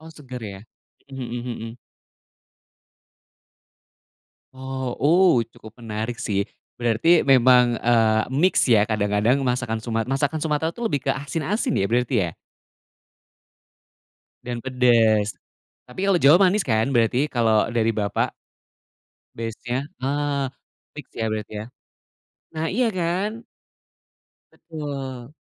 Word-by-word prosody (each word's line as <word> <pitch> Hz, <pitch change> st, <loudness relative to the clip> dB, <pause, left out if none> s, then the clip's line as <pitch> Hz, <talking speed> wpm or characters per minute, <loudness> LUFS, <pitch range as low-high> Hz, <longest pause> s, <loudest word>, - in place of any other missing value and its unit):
Oh, 160 Hz, +1 st, -12 dB
segar 130 Hz, -6 st, -10 dB
ya. 100 Hz, -2 st, -7 dB, 0.5 s
Mhm 135 Hz, -2 st, -6 dB
mhm 120 Hz, 0 st, -4 dB
mhm. 115 Hz, 0 st, -6 dB, 2.8 s
Oh, 130 Hz, -1 st, -5 dB, 0.4 s
uh, 115 Hz, -, -1 dB
cukup 110 Hz, 0 st, -15 dB
menarik 115 Hz, +1 st, -5 dB
sih. 100 Hz, -1 st, -1 dB, 0.3 s
Berarti 120 Hz, +8 st, +3 dB
memang, 125 Hz, -2 st, +5 dB
eee, 110 Hz, -2 st, +3 dB
mix 180 Hz, +7 st, +3 dB
ya, 115 Hz, -5 st, +5 dB
kadang-kadang 105 Hz, +3 st, +1 dB
masakan 120 Hz, -3 st, -1 dB
sumat 115 Hz, 0 st, -3 dB
masakan 145 Hz, +3 st, 0 dB
Sumatra 160 Hz, +1 st, -1 dB
tuh 235 Hz, -2 st, -3 dB
lebih 140 Hz, -, -2 dB
ke -, -, +3 dB
asin-asin 165 Hz, -, -2 dB
ya 95 Hz, -, +1 dB
berarti 125 Hz, +4 st, 0 dB
ya? -, -, -5 dB, 2.1 s
Dan 120 Hz, -1 st, -4 dB
pedes, 115 Hz, -6 st, +3 dB, 0.5 s
tapi 185 Hz, +11 st, -4 dB
kalau 195 Hz, -, +4 dB
Jawa 150 Hz, 0 st, +6 dB
manis 200 Hz, +1 st, +1 dB
kan 110 Hz, 0 st, +1 dB
berarti 125 Hz, +3 st, +2 dB
kalau 115 Hz, -4 st, +2 dB
dari 115 Hz, -1 st, +1 dB
Bapak? 105 Hz, -2 st, -1 dB, 1.1 s
Base-nya, 115 Hz, +2 st, -4 dB, 0.3 s
eee, 140 Hz, 0 st, -1 dB, 0.5 s
fiks -, -, -11 dB
ya -, -, 0 dB
berarti 110 Hz, -1 st, -4 dB
ya. 110 Hz, -, -7 dB, 0.9 s
Nah, 160 Hz, +1 st, -1 dB
iya 245 Hz, +3 st, +2 dB
kan? 195 Hz, +7 st, -2 dB, 1.1 s
Betul. 140 Hz, -5 st, -7 dB
125 Hz, 115 wpm, -23 LUFS, 115-145 Hz, 2.8 s, Jawa